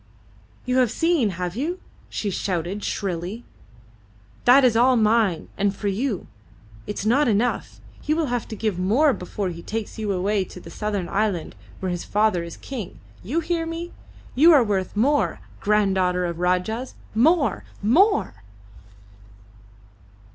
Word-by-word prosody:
"You 255 0 +1
have 250 -3 +4
seen. 325 -3 +2
Have 180 -1 -4
you?" 330 +9 -2 0.3
she 205 - -3
shouted, 185 +2 -2
shrilly. 190 +3 -3 1.0
"That 265 +3 +7
is 240 -3 +3
all 250 +3 +5
mine, 215 -5 +2
and 200 0 +1
for 205 - -2
you. 210 0 -2 0.6
It 210 - -4
is - - -3
not 255 +6 +3
enough! 225 +2 0 0.2
He 305 - 0
will 325 -1 +1
have 245 -3 -2
to 220 - -6
give 210 -4 -2
more 250 +11 +3
before 190 0 -4
he 170 -1 -7
takes 220 +3 -5
you 210 -2 -1
away 195 +2 +1
to 180 - -11
the - - -12
southern 205 -4 -3
island 200 -5 -1 0.3
where 185 -1 -1
his 175 -1 -3
father 210 -4 +1
is 170 -1 -8
king. 235 -9 -7 0.2
You 280 - -1
hear 330 0 -1
me? 335 +1 -5 0.4
You 315 +7 +7
are 280 -5 +6
worth 195 -4 -2
more, 280 +7 +2 0.2
granddaughter 190 -4 +2
of 170 -1 -3
Rajahs! 180 +8 -1 0.2
More! 285 +7 +3 0.2
More!" 350 - +3
215 Hz, 150 wpm, -23 LUFS, 185-255 Hz, 1.0 s, That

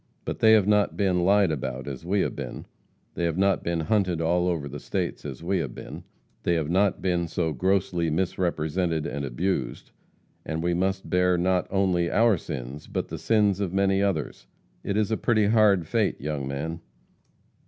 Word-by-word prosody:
But - - -4
they 110 0 +6
have 105 -3 +5
not 105 -1 +2
been 95 -3 +1
lied 100 -1 +4
about 65 -2 -4
as 70 0 -6
we 95 +3 +1
have - - -2
been; - - -6 0.5
they 85 - -2
have 85 0 -1
not 95 -1 +2
been 85 -1 -1
hunted 95 -2 +1
all 90 +2 +1
over 80 -5 -1
the 70 +1 -7
states - - -3
as - - -7
we 95 +2 0
have 70 -7 -4
been; - - -9 0.4
they 85 - +1
have 80 -1 -1
not 95 +1 +2
been 90 -2 0
so 80 -1 -1
grossly 90 +2 0
misrepresented 85 -1 -1
and 70 - -4
abused, 70 -1 -3 0.5
and 80 +1 -3
we 85 0 +1
must 95 +2 -1
bear 90 0 +3
not 90 +1 +1
only 95 -3 +1
our 115 -1 +4
sins, 70 -3 -7
but - - -3
the - - -6
sins 105 -4 +2
of 95 -3 -2
many 95 0 +2
others. 80 -11 -2 0.4
It 100 - -1
is 110 0 +1
a 110 - +1
pretty 110 -3 +2
hard 105 -5 +4
fate, - - 0
young 70 -2 -3
man.' 80 +5 -4
90 Hz, 185 wpm, -26 LUFS, 80-100 Hz, 0.5 s, they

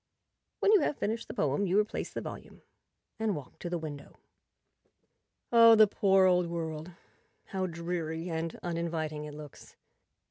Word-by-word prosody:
When 405 - +4
you 425 - +7
have 295 - -1
finished 225 +3 -2
the - - -7
poem 150 +8 0
you 190 +3 +3
replace 210 0 -2
the - - -4
volume - - -9 0.6
and 220 -3 0
walk 145 -4 -10
to 175 - -5
the 175 - -1
window. 150 -3 -8 1.3
Oh, 230 -1 +8
the 215 0 +8
poor 195 -2 +3
old 180 -1 +3
world; 160 -1 -4 0.6
how 190 -1 -2
dreary 170 -1 -4
and 165 -1 -3
uninviting 165 -3 -3
it 150 -1 -8
looks! 150 -2 -12
170 Hz, 150 wpm, -30 LUFS, 160-195 Hz, 1.3 s, Oh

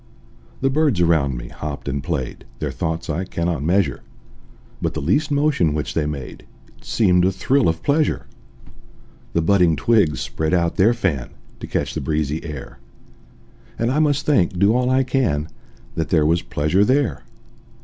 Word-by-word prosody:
The 135 0 +2
birds 145 - +2
around 80 -7 +2
me - - -7
hopped 75 -2 -6
and 70 0 -2
played, 70 -8 -3
Their - - -3
thoughts 80 +1 -3
I 85 +4 -2
cannot 85 -4 -2
measure: 85 -3 +1 0.8
But - - -2
the - - -1
least 120 - +1
motion 140 - +2
which 75 - -3
they 75 -2 0
made 70 -4 -6 0.3
It - - -24
seemed 90 -5 +3
a 95 - +3
thrill 130 +4 +2
of 80 0 -3
pleasure. 150 +1 +1 1.1
The 85 - +1
budding 90 -2 +4
twigs 100 -2 +2
spread 80 +3 -1
out 85 -1 0
their 110 +5 +4
fan, 80 - -1 0.3
To - - -7
catch - - -2
the - - -3
breezy 75 +1 -1
air; 75 -6 -8 1.0
And 115 +2 0
I 145 - +1
must 145 -2 +1
think, 105 -10 +2
do 100 +4 +4
all 125 0 +1
I 130 +1 +3
can, 120 - 0 0.4
That 80 - -2
there 80 -3 +3
was 85 +3 +2
pleasure 75 +10 +1
there. 130 +3 +1
85 Hz, 170 wpm, -21 LUFS, 75-120 Hz, 1.1 s, budding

